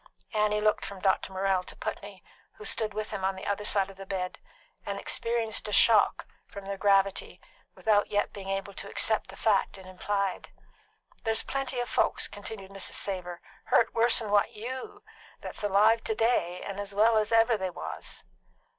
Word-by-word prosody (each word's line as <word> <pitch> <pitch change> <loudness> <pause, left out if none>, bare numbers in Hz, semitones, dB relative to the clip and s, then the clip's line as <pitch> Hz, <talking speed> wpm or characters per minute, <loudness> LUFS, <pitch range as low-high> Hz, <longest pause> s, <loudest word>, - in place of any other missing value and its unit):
Annie 210 0 +2
looked 215 0 +2
from 200 -1 -6
Dr. 190 0 +1
Morrell 190 0 +1
to - - -10
Putney, - - -6 0.3
who 430 - -12
stood 220 - 0
with 215 +1 -4
him 190 - -4
on 190 0 +1
the 190 - -8
other 205 +1 -1
side 200 -2 +2
of 190 - -17
the 195 - -8
bed, 185 -2 -3 0.4
and 200 0 -4
experienced 230 0 -1
a - - -4
shock 215 0 +5 0.2
from 200 -1 -9
their 200 0 -3
gravity 195 0 +2 0.4
without 210 -2 +2
yet 205 0 0
being 195 -2 -7
able 195 +1 -3
to 195 - -8
accept 220 -1 +1
the - - -10
fact 205 -2 +1
it 190 - -12
implied. 195 +1 -2 0.7
"There's 225 0 +1
plenty 270 -2 -2
of 245 - -1
folks," - - +1
continued 200 -1 -8
Mrs. 195 -1 -4
Savor, 180 -3 -2 0.2
"hurt 230 - +3
worse'n 230 -2 +3
what 205 -1 +3
you 250 +4 -6
be - - -20 0.3
that's - - -7
alive 210 +3 +4
to 220 - 0
day 195 -6 +1
and 200 0 -5
as 200 0 -5
well 220 +2 +5
as 215 +1 -1
ever 225 +1 +5
they 190 -3 -2
was." 175 - -7
205 Hz, 185 wpm, -29 LUFS, 195-220 Hz, 0.7 s, shock